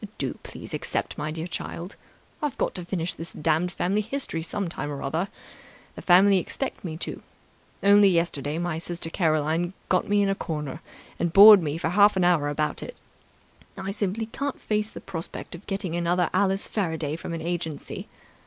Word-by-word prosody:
"Do -, -, -3 dB
please -, -, -10 dB
accept, -, -, -2 dB
my 150 Hz, -, -3 dB
dear 160 Hz, +1 st, -4 dB
child. 175 Hz, +1 st, -6 dB, 0.5 s
I've 295 Hz, -4 st, -2 dB
got -, -, 0 dB
to 180 Hz, -, -5 dB
finish 175 Hz, -1 st, -1 dB
this 165 Hz, -, -8 dB
damned 165 Hz, +3 st, +1 dB
family 195 Hz, +4 st, 0 dB
history 225 Hz, -7 st, -3 dB
some 195 Hz, +3 st, -3 dB
time 155 Hz, -3 st, -4 dB
or 140 Hz, -1 st, -5 dB
other. 160 Hz, +7 st, -1 dB, 0.7 s
The -, -, -9 dB
family 190 Hz, +2 st, +6 dB
expect 270 Hz, +9 st, -4 dB
me 160 Hz, -4 st, -5 dB
to. -, -, -5 dB, 0.6 s
Only 200 Hz, 0 st, +7 dB
yesterday 165 Hz, -4 st, 0 dB
my 170 Hz, -2 st, -2 dB
sister 170 Hz, -1 st, -4 dB
Caroline 160 Hz, +1 st, +1 dB, 0.2 s
got 185 Hz, -, +2 dB
me 205 Hz, 0 st, +4 dB
in 200 Hz, -, +1 dB
a -, -, +3 dB
corner 150 Hz, -7 st, -4 dB, 0.4 s
and 170 Hz, -, 0 dB
bored 205 Hz, +1 st, +10 dB
me 150 Hz, -1 st, -2 dB
for 165 Hz, -, -1 dB
half 205 Hz, +2 st, +5 dB
an 185 Hz, -, +3 dB
hour 170 Hz, -5 st, +3 dB
about 150 Hz, +1 st, -1 dB
it. -, -, -7 dB, 0.8 s
I 195 Hz, 0 st, -3 dB
simply 205 Hz, +2 st, -2 dB
can't 275 Hz, +5 st, -4 dB
face 210 Hz, 0 st, -1 dB
the -, -, -10 dB
prospect 170 Hz, -4 st, -6 dB
of 175 Hz, +3 st, -11 dB
getting 195 Hz, -4 st, -3 dB
another 175 Hz, 0 st, +1 dB
Alice 195 Hz, +1 st, +1 dB
Faraday 160 Hz, -7 st, -2 dB
from 170 Hz, -, -6 dB
an 165 Hz, -, -4 dB
agency. 165 Hz, -3 st, -4 dB
175 Hz, 180 wpm, -26 LUFS, 160-195 Hz, 0.8 s, bored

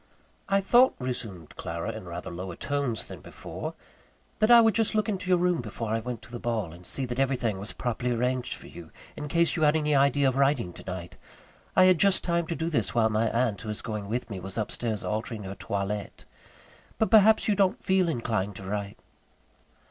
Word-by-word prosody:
"I 195 Hz, 0 st, +3 dB
thought," 245 Hz, +6 st, +5 dB
resumed 110 Hz, -, -5 dB
Clara, 85 Hz, +6 st, -4 dB
in 110 Hz, -3 st, -8 dB
rather 85 Hz, 0 st, -6 dB
lower 90 Hz, 0 st, -6 dB
tones 140 Hz, -3 st, -1 dB
than -, -, -9 dB
before, -, -, -7 dB, 0.6 s
"that 215 Hz, +1 st, +3 dB
I 240 Hz, -1 st, +10 dB
would 225 Hz, -1 st, +5 dB
just 225 Hz, +1 st, +1 dB
look 215 Hz, -1 st, +2 dB
into 190 Hz, -3 st, -3 dB
your 180 Hz, -, +5 dB
room 175 Hz, -3 st, +1 dB
before 115 Hz, -1 st, -5 dB
I 115 Hz, -, +1 dB
went 115 Hz, 0 st, -6 dB
to 115 Hz, -, -14 dB
the 120 Hz, -, -5 dB
ball, 110 Hz, -9 st, -2 dB
and 85 Hz, +1 st, -11 dB
see 135 Hz, -, 0 dB
that 125 Hz, +1 st, -4 dB
everything 125 Hz, -7 st, 0 dB
was 100 Hz, -, -5 dB
properly 120 Hz, 0 st, -2 dB
arranged 125 Hz, +1 st, -1 dB
for -, -, -13 dB
you, 85 Hz, -2 st, -11 dB, 0.3 s
in 150 Hz, -, -5 dB
case 170 Hz, +2 st, +2 dB
you 165 Hz, -, -2 dB
had 150 Hz, 0 st, +4 dB
any 150 Hz, -1 st, +1 dB
idea 140 Hz, 0 st, +4 dB
of 130 Hz, 0 st, 0 dB
writing 135 Hz, -10 st, +2 dB
tonight; 90 Hz, -1 st, -7 dB, 0.6 s
I 185 Hz, -, +7 dB
had 185 Hz, -3 st, +5 dB
just 195 Hz, -1 st, +4 dB
time 170 Hz, -1 st, 0 dB
to 170 Hz, -, -2 dB
do 160 Hz, +2 st, -2 dB
this 115 Hz, -, -1 dB
while 110 Hz, -2 st, +4 dB
my 110 Hz, +1 st, +2 dB
aunt, 115 Hz, -4 st, 0 dB
who 110 Hz, -, -6 dB
is 105 Hz, -, -4 dB
going 105 Hz, -3 st, -4 dB
with 120 Hz, +1 st, -3 dB
me, 95 Hz, -, -4 dB
was 95 Hz, +4 st, -6 dB
upstairs 110 Hz, 0 st, -2 dB
altering 110 Hz, 0 st, -3 dB
her 95 Hz, 0 st, -5 dB
toilette. 100 Hz, +1 st, -4 dB, 0.7 s
But 220 Hz, -, +1 dB
perhaps 220 Hz, 0 st, +6 dB
you 210 Hz, -, +4 dB
don't 195 Hz, -2 st, +1 dB
feel 190 Hz, -2 st, +2 dB
inclined 110 Hz, -, -1 dB
to 95 Hz, -, -9 dB
write?" 100 Hz, +1 st, -4 dB
120 Hz, 210 wpm, -27 LUFS, 105-165 Hz, 0.7 s, I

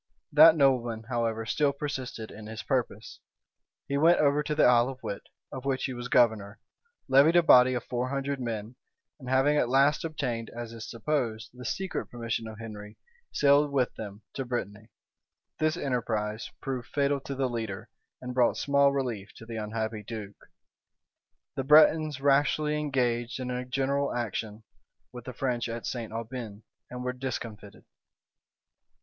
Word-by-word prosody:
That 155 Hz, +2 st, +8 dB
nobleman, 125 Hz, -6 st, +2 dB
however, 115 Hz, -2 st, -1 dB
still 140 Hz, +4 st, +1 dB
persisted 130 Hz, -6 st, -5 dB
in 105 Hz, 0 st, -10 dB
his 110 Hz, 0 st, -7 dB
purpose. 120 Hz, -5 st, -2 dB, 0.7 s
He 140 Hz, 0 st, 0 dB
went 165 Hz, +3 st, +5 dB
over 145 Hz, 0 st, +3 dB
to 150 Hz, 0 st, -2 dB
the -, -, +4 dB
Isle 120 Hz, 0 st, +5 dB
of 130 Hz, -1 st, -9 dB
Wight, 100 Hz, -, -4 dB, 0.3 s
of 130 Hz, -, -7 dB
which 135 Hz, -1 st, -1 dB
he 130 Hz, -, -3 dB
was 120 Hz, 0 st, -6 dB
governor, 110 Hz, -6 st, +2 dB, 0.5 s
levied 140 Hz, +5 st, +5 dB
a 175 Hz, -, +6 dB
body 125 Hz, -4 st, +6 dB
of 120 Hz, -, -3 dB
four 125 Hz, +1 st, -2 dB
hundred 140 Hz, 0 st, -2 dB
men; 115 Hz, -1 st, -5 dB, 0.4 s
and 130 Hz, -2 st, -8 dB
having 135 Hz, +3 st, +3 dB
at 120 Hz, -, +2 dB
last 140 Hz, +3 st, +3 dB
obtained, 120 Hz, -8 st, -3 dB
as 120 Hz, -1 st, -6 dB
is 115 Hz, -1 st, -8 dB
supposed, 115 Hz, -2 st, -2 dB
the 125 Hz, 0 st, -10 dB
secret 190 Hz, +8 st, -3 dB
permission 115 Hz, -1 st, -4 dB
of 110 Hz, -1 st, -9 dB
Henry, 105 Hz, -2 st, -9 dB, 0.3 s
sailed 145 Hz, 0 st, +4 dB
with 130 Hz, -3 st, +1 dB
them 105 Hz, -1 st, -8 dB
to 135 Hz, -, -3 dB
Brittany. 110 Hz, -3 st, -5 dB, 0.7 s
This 155 Hz, +2 st, +1 dB
enterprise 110 Hz, -7 st, -2 dB
proved 130 Hz, -4 st, -4 dB
fatal 140 Hz, 0 st, 0 dB
to 140 Hz, +1 st, -6 dB
the 135 Hz, -1 st, 0 dB
leader, 110 Hz, -5 st, -5 dB, 0.4 s
and 125 Hz, 0 st, -5 dB
brought 125 Hz, -1 st, +3 dB
small 140 Hz, 0 st, +3 dB
relief 120 Hz, -8 st, -3 dB
to 115 Hz, -, -12 dB
the 115 Hz, 0 st, -6 dB
unhappy 110 Hz, 0 st, -3 dB
duke. 105 Hz, -2 st, -9 dB, 1.1 s
The 135 Hz, -, -2 dB
Bretons 155 Hz, 0 st, +5 dB
rashly 145 Hz, +2 st, +2 dB
engaged 125 Hz, -4 st, -1 dB
in 125 Hz, -1 st, -3 dB
a 125 Hz, 0 st, -3 dB
general 135 Hz, +2 st, 0 dB
action 110 Hz, -2 st, -4 dB, 0.5 s
with 125 Hz, -1 st, -10 dB
the 130 Hz, -, -6 dB
French 120 Hz, -1 st, -2 dB
at 115 Hz, 0 st, -5 dB
St. 115 Hz, -3 st, -4 dB
Aubin, 115 Hz, -2 st, -6 dB, 0.3 s
and 125 Hz, 0 st, -6 dB
were 125 Hz, 0 st, -2 dB
discomfited. 115 Hz, -5 st, -6 dB
125 Hz, 160 wpm, -28 LUFS, 115-140 Hz, 1.1 s, That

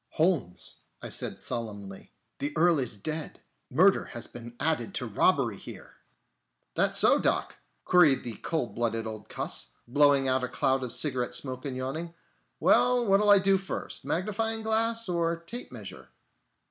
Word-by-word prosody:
"Holmes," 155 Hz, -, 0 dB, 0.3 s
I -, -, -5 dB
said -, -, -3 dB
solemnly, 100 Hz, -4 st, -5 dB, 0.3 s
"the 145 Hz, +1 st, -2 dB
Earl 170 Hz, -1 st, +4 dB
is 125 Hz, -5 st, -1 dB
dead! 155 Hz, +9 st, -4 dB, 0.3 s
Murder 185 Hz, +9 st, +4 dB
has 120 Hz, -2 st, -6 dB
been 120 Hz, 0 st, -10 dB
added 155 Hz, -8 st, -1 dB
to -, -, -1 dB
robbery -, -, +1 dB
here!" -, -, -11 dB, 0.8 s
"That -, -, +2 dB
so, -, -, +6 dB
Doc?" -, -, 0 dB, 0.3 s
queried 160 Hz, -7 st, +4 dB
the 115 Hz, -3 st, -6 dB
cold 160 Hz, -7 st, -3 dB
blooded 115 Hz, -1 st, -1 dB
old 110 Hz, -1 st, -7 dB
cuss, -, -, -3 dB, 0.2 s
blowing 140 Hz, +1 st, +4 dB
out 130 Hz, 0 st, +2 dB
a -, -, 0 dB
cloud 130 Hz, +1 st, 0 dB
of 125 Hz, -, -4 dB
cigarette 125 Hz, -3 st, +1 dB
smoke 130 Hz, 0 st, -4 dB
and 130 Hz, -2 st, -4 dB
yawning. 155 Hz, +7 st, -4 dB, 0.4 s
"Well, 245 Hz, -1 st, +4 dB
what'll 205 Hz, +1 st, +3 dB
I 205 Hz, -, +9 dB
do 195 Hz, 0 st, +3 dB
first, 195 Hz, -, -6 dB
magnifying 220 Hz, +4 st, -1 dB
glass 230 Hz, +1 st, +1 dB
or 170 Hz, -1 st, 0 dB
tape 230 Hz, +9 st, -7 dB
measure?" 100 Hz, -6 st, -10 dB
145 Hz, 155 wpm, -28 LUFS, 120-185 Hz, 0.8 s, I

